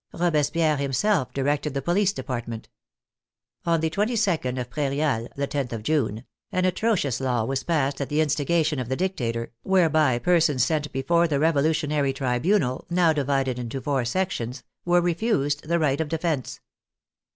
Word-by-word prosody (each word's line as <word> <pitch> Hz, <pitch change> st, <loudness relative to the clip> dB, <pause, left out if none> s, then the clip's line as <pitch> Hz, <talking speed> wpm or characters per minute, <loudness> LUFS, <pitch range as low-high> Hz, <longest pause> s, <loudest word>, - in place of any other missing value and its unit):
Robespierre 155 Hz, -2 st, +1 dB
himself 140 Hz, +4 st, 0 dB
directed 145 Hz, +1 st, -1 dB
the 140 Hz, -, -1 dB
police 190 Hz, +4 st, +2 dB
department. 120 Hz, -, -5 dB, 1.0 s
On 165 Hz, -1 st, +2 dB
the 160 Hz, -, +1 dB
226. 195 Hz, -, 0 dB
of 125 Hz, -1 st, -5 dB
Prairial 140 Hz, -3 st, -1 dB
(the 140 Hz, 0 st, -2 dB
loth 135 Hz, -3 st, -1 dB
of 115 Hz, -2 st, -5 dB
June), 120 Hz, -5 st, 0 dB, 0.3 s
an 185 Hz, 0 st, +1 dB
atrocious 185 Hz, -, 0 dB
law 125 Hz, -3 st, 0 dB
was 135 Hz, +2 st, -1 dB
passed 145 Hz, -4 st, 0 dB
at 140 Hz, -, -3 dB
the 150 Hz, -, 0 dB
instigation 155 Hz, 0 st, +1 dB
of 125 Hz, -2 st, -4 dB
the 130 Hz, -, 0 dB
dictator, 120 Hz, -11 st, -2 dB
whereby 155 Hz, -8 st, +3 dB
persons 155 Hz, -4 st, +3 dB
sent 150 Hz, -2 st, -1 dB
before 170 Hz, +6 st, +2 dB
the 145 Hz, -3 st, 0 dB
revolutionary 150 Hz, -2 st, +1 dB
tribunal, 130 Hz, +2 st, 0 dB
now 175 Hz, -2 st, +3 dB
divided 135 Hz, -3 st, 0 dB
into 120 Hz, +2 st, -4 dB
four 135 Hz, -2 st, -1 dB
sections, 125 Hz, -3 st, -2 dB, 0.2 s
were 175 Hz, 0 st, +4 dB
refused 165 Hz, -6 st, 0 dB
the 170 Hz, -, +3 dB
right 150 Hz, -2 st, +1 dB
of 155 Hz, -, -3 dB
defence. 160 Hz, -4 st, -2 dB
145 Hz, 150 wpm, -25 LUFS, 130-170 Hz, 1.0 s, were